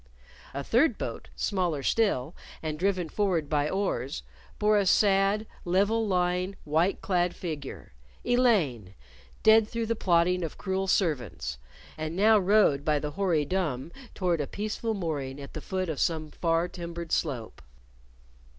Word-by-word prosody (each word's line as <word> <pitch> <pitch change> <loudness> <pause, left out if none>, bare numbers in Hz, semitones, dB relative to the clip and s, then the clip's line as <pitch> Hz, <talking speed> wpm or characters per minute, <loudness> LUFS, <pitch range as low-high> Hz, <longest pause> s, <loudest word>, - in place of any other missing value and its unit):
A 140 +1 -4
third 245 - +3
boat, - - -5
smaller 175 -8 -1
still, 170 - +1 0.3
and 155 -1 -3
driven 185 -2 0
forward 175 -3 0
by 145 0 +1
oars, 165 -8 -2 0.3
bore 210 0 +3
a 200 - +1
sad, 200 +2 +3 0.2
level 205 +5 +2
lying, 180 0 0
white 160 +6 +1
clad 180 -2 +1
figure 150 - -6 0.3
Elaine, 165 - +2 0.5
dead 220 0 +6
through 230 0 -3
the 230 +1 0
plotting 180 -2 +2
of 165 - -5
cruel 190 -1 -2
servants, 125 - -1 0.4
and 155 +1 -3
now 215 +3 +5
rowed 190 -8 +3
by 150 0 +2
the 150 +1 -3
hoary 165 -3 +1
dumb 160 -5 -2 0.2
toward 175 -4 0
a 145 - -3
peaceful 215 - -3
mooring 145 -7 -3
at 140 - -9
the 155 - -6
foot 185 +2 -2
of 155 -4 -3
some 155 -2 0
far 165 0 +1
timbered 170 -2 -7
slope. 120 - -2
175 Hz, 145 wpm, -28 LUFS, 150-200 Hz, 0.5 s, dead